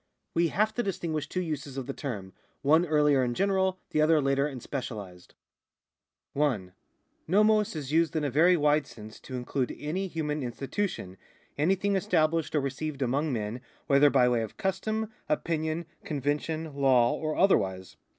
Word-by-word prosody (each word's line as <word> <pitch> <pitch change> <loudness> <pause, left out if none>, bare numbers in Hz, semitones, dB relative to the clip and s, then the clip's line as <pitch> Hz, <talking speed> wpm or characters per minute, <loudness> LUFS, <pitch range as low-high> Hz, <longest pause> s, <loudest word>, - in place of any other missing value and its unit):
We 170 0 +3
have 215 +7 +1
to 240 - 0
distinguish 170 -7 -3
two 185 - -2
uses 145 -4 -5
of 135 - -3
the 140 - -4
term, 100 -11 -6 0.3
one 160 +5 +4
earlier 150 -3 +3
and 120 -1 -1
general, 190 0 +1
the 155 - +2
other 155 0 +5
later 135 0 +1
and 135 -4 -6
specialised. 105 -10 -7 1.0
1. 120 -11 0 0.5
No/ioc 210 +2 +3
is 145 -3 -5
used 165 +1 +2
in 155 - 0
a 145 - -1
very 170 +6 +5
wide 150 -1 +2
sense 110 -1 -11
to 130 - -8
include 125 +1 -2
any 180 +6 -3
human 155 -3 -3
institution, 130 - -3 0.4
anything 190 +6 +1
established 165 -5 +1
or 150 - +3
received 140 +1 -3
among 140 +5 0
men, 115 0 -3 0.2
whether 140 +1 +5
by 130 -3 +4
way 120 -2 +2
of 110 - -6
custom, 215 +3 -2 0.2
opinion, 160 +1 -1 0.2
convention, 150 +2 -2
law 130 -4 +4
or 155 -1 -2
otherwise. 95 - +1
150 Hz, 160 wpm, -28 LUFS, 130-170 Hz, 1.0 s, other